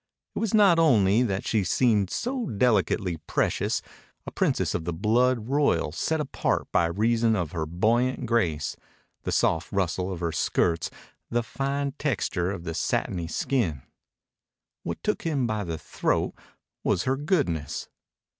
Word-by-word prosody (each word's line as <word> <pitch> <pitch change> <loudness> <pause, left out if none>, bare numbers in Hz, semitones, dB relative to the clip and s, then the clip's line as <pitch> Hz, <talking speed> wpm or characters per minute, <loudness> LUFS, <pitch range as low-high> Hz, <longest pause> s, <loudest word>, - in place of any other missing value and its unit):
It - - -1
was 225 -3 0
not 195 -6 +6
only 110 -9 +4
that 100 -6 -1
she 110 -3 +1
seemed 105 -1 +2
so 250 - -2
delicately 100 - +1
precious, - - 0 0.4
a - - -6
princess - - 0
of - - -2
the 85 - -3
blood 115 +5 +2
royal 135 - +2
set 160 - -1
apart 145 -3 -1
by 85 - +3
reason 115 +5 +2
of 85 -6 -2
her 80 -3 -3
buoyant 120 - +1
grace, 90 -10 0 0.5
the - - -1
soft 85 +2 +1
rustle 95 -1 -1
of 90 - -5
her 85 -1 -1
skirts, 85 +1 +1 0.4
the 120 0 0
fine 140 +3 -2
texture 95 - 0
of 95 -3 -5
the 85 -1 -4
satiny 85 +1 -1
skin. 85 - -1 1.0
What 85 - -5
took 210 - 0
him 145 -6 0
by 110 -2 -1
the 85 -3 -4
throat 75 - -1 0.5
was 90 - +1
her 130 +1 +1
goodness. 135 - -1
105 Hz, 150 wpm, -26 LUFS, 85-130 Hz, 1.0 s, not